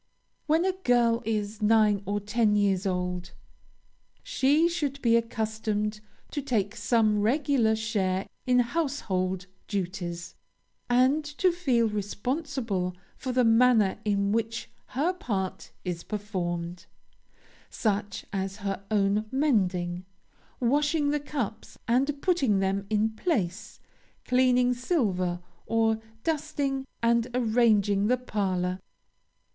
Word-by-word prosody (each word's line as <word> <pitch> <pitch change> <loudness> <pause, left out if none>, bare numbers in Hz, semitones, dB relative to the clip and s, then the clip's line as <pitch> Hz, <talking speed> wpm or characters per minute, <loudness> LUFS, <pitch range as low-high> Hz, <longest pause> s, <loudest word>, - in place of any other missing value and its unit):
When 320 +3 +3
a 380 - +3
girl 245 -10 +2
is 215 -1 -2
nine 210 -2 +4
or 205 +1 0
ten 210 +1 +1
years 200 -1 +2
old, 180 -1 -2 0.9
she 290 +5 +3
should 295 -5 -2
be 230 -1 +4
accustomed 220 -2 -1 0.3
to 290 - -2
take 220 -7 -1
some 220 -2 +2
regular 245 -1 +2
share 200 -4 -1 0.2
in 250 0 +4
household 200 - -1 0.2
duties, 175 -3 -4 0.6
and 260 +5 +3
to 295 +5 +1
feel 265 -10 +1
responsible 210 - -2 0.2
for 255 - -4
the 250 0 +3
manner 225 -4 +4
in 200 -1 +1
which 225 +1 -2 0.2
her 305 +8 0
part 195 - -3 0.2
is 175 -2 -3
performed 180 -4 -4 0.8
such 205 -2 -2
as 195 0 -2
her 195 0 -2
own 205 0 +2
mending, 185 -11 +1 0.6
washing 290 +4 +2
the 295 - +1
cups 265 -7 -5
and 275 +4 +1
putting 280 - +2
them 195 +1 0
in 215 +1 +2
place, 220 - -2 0.5
cleaning 250 0 +3
silver, 195 - 0 0.3
or 225 -1 +2 0.2
dusting 285 -4 -1 0.2
and 235 0 +3
arranging 215 -4 +3
the 250 +2 +3
parlor. 185 -6 -1
220 Hz, 110 wpm, -27 LUFS, 200-255 Hz, 0.9 s, nine